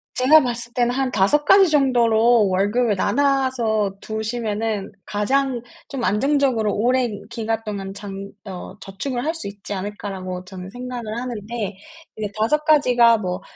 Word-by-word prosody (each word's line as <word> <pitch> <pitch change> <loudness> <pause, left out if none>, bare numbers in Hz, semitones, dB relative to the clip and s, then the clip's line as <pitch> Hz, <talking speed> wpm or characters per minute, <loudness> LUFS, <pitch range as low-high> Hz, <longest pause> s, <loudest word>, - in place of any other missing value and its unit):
제가 290 +5 +6
봤을 240 -1 -1
때는 245 -1 +1
'한 265 0 -1
5 215 +8 +3
가지 385 +4 +6
정도로 240 -5 +4
월급을 205 +4 +1
나눠서 255 -5 +1
두시면은 220 -2 -3
가장 255 +4 0 0.3
좀 270 -4 -4
안정적으로 240 0 +1
오랜 240 -1 +1
기간 225 -1 -2
동안 195 -2 -5
장 200 0 -8
어 190 0 -8
저축을 240 +6 -4
할 320 - 0
수 325 -10 -5
있지 200 0 -7
않을까?'라고 190 -2 -5
저는 185 0 -9
생각을 245 -1 -6
하는데 225 -4 -5 0.4
이제 210 -2 -4
5 300 +8 +2
가지가 250 -7 +5
뭐 180 -4 -4
225 Hz, 285 characters per minute, -21 LUFS, 205-255 Hz, 0.4 s, 제가